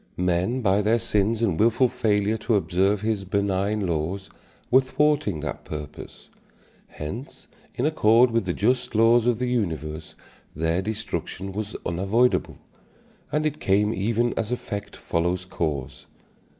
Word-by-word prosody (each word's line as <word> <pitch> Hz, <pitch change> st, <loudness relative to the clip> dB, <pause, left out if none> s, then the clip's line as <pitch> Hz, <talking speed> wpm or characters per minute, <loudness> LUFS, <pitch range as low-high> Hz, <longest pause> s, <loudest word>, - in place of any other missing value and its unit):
Men 90 Hz, +8 st, 0 dB
by 100 Hz, -2 st, +3 dB
their 110 Hz, +3 st, +3 dB
sins 110 Hz, 0 st, 0 dB
and 95 Hz, -8 st, +1 dB
wilful 115 Hz, +4 st, +4 dB
failure 110 Hz, -3 st, +1 dB
to 110 Hz, +1 st, +1 dB
observe 95 Hz, +2 st, +1 dB
his 110 Hz, -2 st, -1 dB
benign 100 Hz, +1 st, 0 dB
laws 85 Hz, +4 st, -3 dB, 0.4 s
were 130 Hz, +2 st, +7 dB
thwarting 130 Hz, -, +1 dB
that 75 Hz, -, -5 dB
purpose. 75 Hz, -2 st, -8 dB, 0.6 s
Hence 105 Hz, -, -7 dB, 0.3 s
in 125 Hz, -, -1 dB
accord 120 Hz, -5 st, +4 dB
with 115 Hz, -3 st, +1 dB
the 90 Hz, -, -1 dB
just 125 Hz, +4 st, 0 dB
laws 115 Hz, +2 st, +5 dB
of 120 Hz, -2 st, +2 dB
the 125 Hz, -, -1 dB
universe 80 Hz, -, -3 dB, 0.4 s
their 80 Hz, +4 st, 0 dB
destruction 105 Hz, -2 st, -4 dB
was 105 Hz, +2 st, -5 dB
unavoidable, 100 Hz, +8 st, +1 dB, 0.7 s
and 150 Hz, +1 st, 0 dB
it 150 Hz, 0 st, -1 dB
came 105 Hz, +3 st, +2 dB
even 115 Hz, +4 st, 0 dB
as 115 Hz, 0 st, -2 dB
effect 105 Hz, -4 st, -4 dB
follows 90 Hz, +2 st, -1 dB
cause. 75 Hz, -8 st, -4 dB
105 Hz, 135 wpm, -25 LUFS, 90-115 Hz, 0.7 s, were